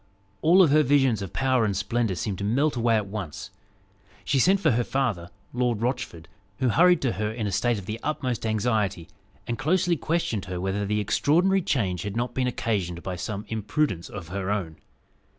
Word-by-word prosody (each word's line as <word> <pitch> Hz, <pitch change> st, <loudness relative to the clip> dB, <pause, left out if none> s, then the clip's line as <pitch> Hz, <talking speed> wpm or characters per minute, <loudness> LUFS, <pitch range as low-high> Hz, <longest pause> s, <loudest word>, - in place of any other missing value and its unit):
All 180 Hz, +4 st, +6 dB
her 155 Hz, 0 st, +4 dB
visions 135 Hz, -6 st, +3 dB
of 95 Hz, -, -5 dB
power 130 Hz, -3 st, +1 dB
and 100 Hz, -3 st, 0 dB
splendour 105 Hz, 0 st, 0 dB
seemed 95 Hz, +1 st, -3 dB
to -, -, -3 dB
melt 135 Hz, +9 st, +1 dB
away 115 Hz, -1 st, +2 dB
at 105 Hz, -2 st, 0 dB
once. 100 Hz, -6 st, -6 dB, 0.7 s
She 140 Hz, -, +2 dB
sent 190 Hz, +8 st, +4 dB
for 160 Hz, -6 st, +3 dB
her 120 Hz, +1 st, +1 dB
father, 110 Hz, -11 st, -1 dB, 0.2 s
Lord 120 Hz, -3 st, 0 dB
Rochford, 115 Hz, -10 st, -3 dB, 0.3 s
who 130 Hz, -, +1 dB
hurried 175 Hz, +6 st, +4 dB
to 130 Hz, -, +2 dB
her 105 Hz, +2 st, -2 dB
in 110 Hz, -1 st, -4 dB
a 100 Hz, -, -1 dB
state 115 Hz, +4 st, +1 dB
of 100 Hz, -, -7 dB
the 110 Hz, +3 st, -5 dB
utmost 130 Hz, -6 st, -2 dB
anxiety, 110 Hz, -6 st, 0 dB, 0.4 s
and 120 Hz, -, -3 dB
closely 175 Hz, +3 st, +2 dB
questioned 150 Hz, -, -1 dB
her 90 Hz, -1 st, -5 dB
whether 95 Hz, +2 st, -2 dB
the 105 Hz, +1 st, 0 dB
extraordinary 175 Hz, -, +2 dB
change 100 Hz, -, -1 dB
had 100 Hz, +1 st, -4 dB
not 120 Hz, 0 st, -2 dB
been 130 Hz, -1 st, 0 dB
occasioned 95 Hz, -8 st, -2 dB
by 95 Hz, -, -4 dB
some 100 Hz, +3 st, -5 dB
imprudence 110 Hz, -, -1 dB
of 90 Hz, -5 st, -8 dB
her 95 Hz, +1 st, -3 dB
own. 95 Hz, -6 st, -2 dB
110 Hz, 190 wpm, -25 LUFS, 100-135 Hz, 0.7 s, All